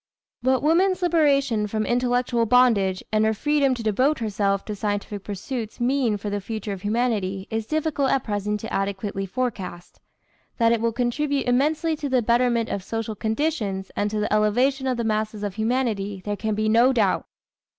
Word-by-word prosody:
What 260 Hz, +2 st, +2 dB
woman's 365 Hz, +4 st, +3 dB
liberation 280 Hz, -10 st, +2 dB
from 215 Hz, +1 st, -2 dB
intellectual 245 Hz, -1 st, +1 dB
bondage 210 Hz, -6 st, +3 dB
and 215 Hz, 0 st, +2 dB
her 220 Hz, 0 st, +2 dB
freedom 285 Hz, +1 st, +2 dB
to 235 Hz, -, -6 dB
devote 255 Hz, +8 st, +2 dB
herself 200 Hz, -3 st, -1 dB
to 210 Hz, -, -4 dB
scientific 205 Hz, -1 st, -3 dB
pursuits 215 Hz, +3 st, -5 dB
mean 245 Hz, -3 st, +1 dB
for 205 Hz, 0 st, -5 dB
the 205 Hz, 0 st, -2 dB
future 215 Hz, 0 st, -4 dB
of 190 Hz, -, -8 dB
humanity 205 Hz, -3 st, -1 dB
it -, -, -2 dB
is 225 Hz, -1 st, -1 dB
difficult 310 Hz, -3 st, 0 dB
at 270 Hz, -, +1 dB
present 210 Hz, 0 st, -2 dB
adequately 195 Hz, -1 st, -2 dB
to -, -, -27 dB
forecast. 195 Hz, -8 st, -4 dB, 0.6 s
That 230 Hz, -1 st, +4 dB
it 230 Hz, -1 st, +1 dB
will 230 Hz, 0 st, +1 dB
contribute 270 Hz, +4 st, -1 dB
immensely 305 Hz, +6 st, +1 dB
to 290 Hz, -1 st, -3 dB
the 255 Hz, -2 st, +2 dB
betterment 235 Hz, 0 st, +2 dB
of 195 Hz, -, -3 dB
social 225 Hz, +1 st, -3 dB
conditions 220 Hz, -4 st, -2 dB
and 205 Hz, -, 0 dB
to 215 Hz, 0 st, -2 dB
the 210 Hz, -, -1 dB
elevation 250 Hz, +6 st, +2 dB
of 255 Hz, -2 st, 0 dB
the 235 Hz, -, -1 dB
masses 215 Hz, -1 st, -1 dB
of 205 Hz, -2 st, -2 dB
humanity, 220 Hz, -4 st, -1 dB
there 205 Hz, 0 st, -1 dB
can 215 Hz, +1 st, -2 dB
be 215 Hz, +1 st, 0 dB
no 235 Hz, +4 st, +5 dB
doubt. 210 Hz, -6 st, +1 dB
225 Hz, 180 wpm, -24 LUFS, 205-255 Hz, 0.6 s, no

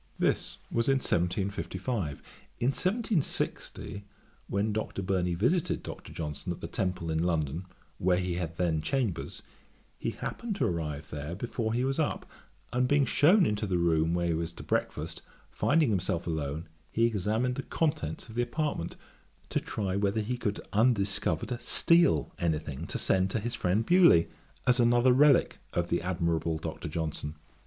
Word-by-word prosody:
This -, -, 0 dB
was 115 Hz, 0 st, +1 dB
in 135 Hz, -, +5 dB
1755. 95 Hz, -, -1 dB, 0.4 s
In 120 Hz, -, +2 dB
1760, 185 Hz, -, -1 dB, 0.4 s
when 105 Hz, +2 st, 0 dB
Dr. 105 Hz, -2 st, -3 dB
Burney 90 Hz, -2 st, 0 dB
visited 135 Hz, -, +1 dB
Dr. -, -, -8 dB
Johnson 75 Hz, +1 st, -4 dB
at 85 Hz, -, -5 dB
the -, -, -6 dB
Temple 90 Hz, -3 st, -2 dB
in 80 Hz, 0 st, +1 dB
London, 85 Hz, 0 st, -1 dB, 0.3 s
where 90 Hz, 0 st, +3 dB
he 90 Hz, -1 st, -1 dB
had 85 Hz, -2 st, -3 dB
then 80 Hz, -4 st, +1 dB
Chambers, 120 Hz, -, -2 dB, 0.6 s
he -, -, -1 dB
happened 230 Hz, -4 st, -4 dB
to -, -, +1 dB
arrive 80 Hz, -3 st, -3 dB
there 75 Hz, +3 st, -4 dB
before 115 Hz, +1 st, -2 dB
he 125 Hz, -, +1 dB
was 135 Hz, +3 st, 0 dB
up; 155 Hz, -, 0 dB, 0.5 s
and 125 Hz, +1 st, +2 dB
being 145 Hz, +1 st, +4 dB
shewn 175 Hz, +9 st, +5 dB
into 105 Hz, 0 st, 0 dB
the 90 Hz, -2 st, +1 dB
room 85 Hz, -1 st, +2 dB
where 85 Hz, 0 st, 0 dB
he 85 Hz, -, +1 dB
was 80 Hz, +1 st, -2 dB
to -, -, -9 dB
breakfast, -, -, -2 dB, 0.3 s
finding 150 Hz, -5 st, +3 dB
himself 90 Hz, -3 st, 0 dB
alone, 80 Hz, 0 st, -3 dB, 0.2 s
he 115 Hz, -, +3 dB
examined 110 Hz, +3 st, +1 dB
the 135 Hz, -, -3 dB
contents 135 Hz, -, -2 dB
of 110 Hz, -, -11 dB
the 120 Hz, -, +1 dB
apartment, 145 Hz, -, -2 dB, 0.5 s
to -, -, +1 dB
try 95 Hz, -3 st, -3 dB
whether 100 Hz, +2 st, +1 dB
he 120 Hz, +4 st, -2 dB
could 110 Hz, -4 st, -2 dB
undiscovered 105 Hz, -1 st, +1 dB
steal 125 Hz, -, +4 dB
any 80 Hz, -3 st, +1 dB
thing 75 Hz, +1 st, -6 dB
to -, -, -3 dB
send 95 Hz, 0 st, +2 dB
to 110 Hz, -, -1 dB
his 120 Hz, +3 st, -3 dB
friend 105 Hz, 0 st, +1 dB
Bewley, 170 Hz, -, +6 dB, 0.4 s
as 125 Hz, 0 st, +4 dB
another 120 Hz, +1 st, +5 dB
relick 140 Hz, +1 st, +5 dB
of 85 Hz, 0 st, 0 dB
the 85 Hz, -, +1 dB
admirable 85 Hz, -3 st, 0 dB
Dr. 80 Hz, 0 st, -5 dB
Johnson. 75 Hz, -1 st, -3 dB
95 Hz, 165 wpm, -29 LUFS, 85-120 Hz, 0.6 s, Bewley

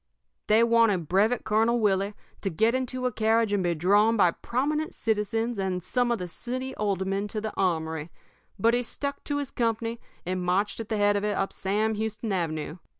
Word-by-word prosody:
"They 220 Hz, +2 st, +5 dB
wanted 230 Hz, -8 st, +3 dB
Brevet 215 Hz, +7 st, +2 dB
Colonel 225 Hz, +3 st, +2 dB
Willie 200 Hz, -1 st, +1 dB, 0.3 s
to 195 Hz, -, -1 dB
get 220 Hz, +7 st, +2 dB
into 255 Hz, 0 st, -2 dB
a 250 Hz, -, +1 dB
carriage 220 Hz, -1 st, +2 dB
and 200 Hz, -, +2 dB
be 175 Hz, -1 st, +1 dB
drawn 205 Hz, +7 st, +3 dB
by 180 Hz, -4 st, +5 dB
prominent 300 Hz, -, -2 dB
citizens 225 Hz, +1 st, -1 dB
and 185 Hz, -2 st, -1 dB
some 245 Hz, +6 st, +1 dB
of 235 Hz, -, +1 dB
the 180 Hz, -3 st, -5 dB
city 255 Hz, +8 st, -5 dB
aldermen 195 Hz, 0 st, -1 dB
to 215 Hz, +1 st, -3 dB
the 215 Hz, 0 st, -4 dB
armory, 160 Hz, -4 st, -1 dB, 0.5 s
but 230 Hz, +4 st, +3 dB
he 245 Hz, -, +2 dB
stuck 280 Hz, +4 st, -5 dB
to 290 Hz, -, -1 dB
his 285 Hz, -3 st, -3 dB
company 230 Hz, 0 st, -1 dB, 0.3 s
and 185 Hz, +1 st, -2 dB
marched 185 Hz, +5 st, 0 dB
at 225 Hz, -, -6 dB
the 220 Hz, -, 0 dB
head 205 Hz, 0 st, +3 dB
of 200 Hz, -, 0 dB
it 210 Hz, 0 st, 0 dB
up 195 Hz, -, -1 dB
Sam 210 Hz, +3 st, 0 dB
Houston 220 Hz, +1 st, -3 dB
Avenue. 165 Hz, -2 st, -2 dB
215 Hz, 195 wpm, -27 LUFS, 190-230 Hz, 0.5 s, They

